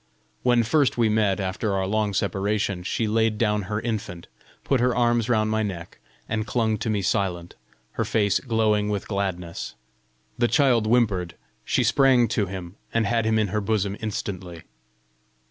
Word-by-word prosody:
When 120 Hz, -2 st, +3 dB
first 140 Hz, +3 st, +2 dB
we 115 Hz, -2 st, +3 dB
met 105 Hz, -2 st, +2 dB
after 100 Hz, +2 st, -2 dB
our 95 Hz, -1 st, 0 dB
long 105 Hz, 0 st, 0 dB
separation, 100 Hz, -1 st, -1 dB
she 110 Hz, +5 st, -1 dB
laid 110 Hz, 0 st, +1 dB
down 105 Hz, -1 st, +1 dB
her 105 Hz, 0 st, -1 dB
infant, 105 Hz, -7 st, -4 dB, 0.4 s
put 135 Hz, -, +1 dB
her 125 Hz, +1 st, +2 dB
arms 120 Hz, -1 st, +2 dB
round 110 Hz, -2 st, +2 dB
my 110 Hz, 0 st, +1 dB
neck, 90 Hz, -5 st, -5 dB, 0.3 s
and 110 Hz, 0 st, -2 dB
clung 110 Hz, -3 st, 0 dB
to -, -, -2 dB
me 105 Hz, -2 st, 0 dB
silent, 90 Hz, -3 st, -1 dB, 0.4 s
her -, -, -2 dB
face 100 Hz, -3 st, +1 dB
glowing 110 Hz, -4 st, +1 dB
with 100 Hz, -2 st, -3 dB
gladness: 95 Hz, -4 st, -4 dB, 0.6 s
the 120 Hz, -, +4 dB
child 120 Hz, -3 st, +3 dB
whimpered; 105 Hz, -8 st, +1 dB, 0.3 s
she -, -, +1 dB
sprang 130 Hz, -3 st, +4 dB
to 105 Hz, -3 st, 0 dB
him, 90 Hz, 0 st, -7 dB
and 115 Hz, -1 st, +1 dB
had 115 Hz, +1 st, +1 dB
him 110 Hz, 0 st, +2 dB
in 105 Hz, -2 st, +1 dB
her 105 Hz, +2 st, -1 dB
bosom 100 Hz, -1 st, 0 dB
instantly. 95 Hz, -5 st, -5 dB
105 Hz, 165 wpm, -24 LUFS, 95-115 Hz, 0.6 s, the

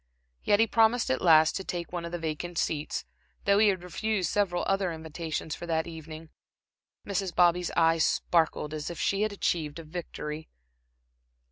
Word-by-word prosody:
Yet 205 Hz, -, +3 dB
he 225 Hz, -, +6 dB
promised 225 Hz, -, +3 dB
at 130 Hz, -, 0 dB
last 160 Hz, -2 st, +6 dB
to 190 Hz, -, -5 dB
take 175 Hz, -1 st, -5 dB
one 175 Hz, -1 st, -3 dB
of 170 Hz, -, -6 dB
the 175 Hz, -, -2 dB
vacant 165 Hz, +1 st, -4 dB
seats, 155 Hz, -2 st, -2 dB, 0.4 s
though 200 Hz, 0 st, +4 dB
he 215 Hz, -, +6 dB
had 190 Hz, -3 st, +1 dB
refused 190 Hz, 0 st, -1 dB
several 190 Hz, -4 st, +1 dB
other 195 Hz, -2 st, +1 dB
invitations 160 Hz, -1 st, -5 dB
for 175 Hz, -, -7 dB
that 160 Hz, -1 st, 0 dB
evening. 160 Hz, -1 st, -9 dB, 0.7 s
Mrs. 195 Hz, -2 st, -2 dB
Bobby's 175 Hz, 0 st, +3 dB
eyes 165 Hz, 0 st, +4 dB
sparkled 160 Hz, -3 st, +1 dB
as 150 Hz, -1 st, -4 dB
if 170 Hz, -, -7 dB
she 200 Hz, +1 st, +1 dB
had 215 Hz, 0 st, +1 dB
achieved 165 Hz, -6 st, -1 dB
a 165 Hz, -, -7 dB
victory. 155 Hz, -2 st, -6 dB
170 Hz, 170 wpm, -28 LUFS, 160-195 Hz, 0.7 s, he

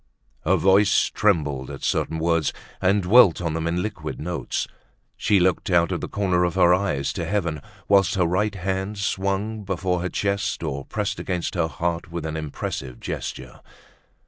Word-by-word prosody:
Her 95 Hz, +4 st, +4 dB
voice 95 Hz, +4 st, +4 dB
trembled 75 Hz, -10 st, +1 dB
at -, -, -8 dB
certain 80 Hz, -, 0 dB
words, 85 Hz, -1 st, +1 dB, 0.3 s
and 95 Hz, +1 st, +3 dB
dwelt 95 Hz, -2 st, +6 dB
on 85 Hz, -3 st, -2 dB
them 80 Hz, 0 st, -2 dB
in 85 Hz, +1 st, 0 dB
liquid 105 Hz, -1 st, -5 dB
notes; 85 Hz, -4 st, -3 dB, 0.5 s
she 100 Hz, -, +2 dB
looked 90 Hz, +1 st, +1 dB
out 85 Hz, -2 st, +3 dB
of -, -, -2 dB
the -, -, -5 dB
corner 95 Hz, -3 st, +1 dB
of 85 Hz, -2 st, 0 dB
her 90 Hz, 0 st, +5 dB
eyes 90 Hz, -8 st, 0 dB
to -, -, -3 dB
heaven, 85 Hz, -8 st, -1 dB, 0.3 s
whilst 100 Hz, +1 st, +4 dB
her 90 Hz, -2 st, +2 dB
right 100 Hz, +5 st, 0 dB
hand 95 Hz, +2 st, -2 dB
swung 100 Hz, +2 st, -1 dB
before 90 Hz, -2 st, -1 dB
her 90 Hz, -, -2 dB
chest 100 Hz, -2 st, -1 dB
or 70 Hz, -3 st, -3 dB
pressed 105 Hz, 0 st, -3 dB
against 90 Hz, -2 st, -2 dB
her 85 Hz, -3 st, +1 dB
heart 85 Hz, +3 st, -3 dB
with 85 Hz, -2 st, -4 dB
an 80 Hz, 0 st, -3 dB
impressive 70 Hz, -4 st, -5 dB
gesture. 65 Hz, -1 st, -6 dB
90 Hz, 170 wpm, -24 LUFS, 80-100 Hz, 0.5 s, dwelt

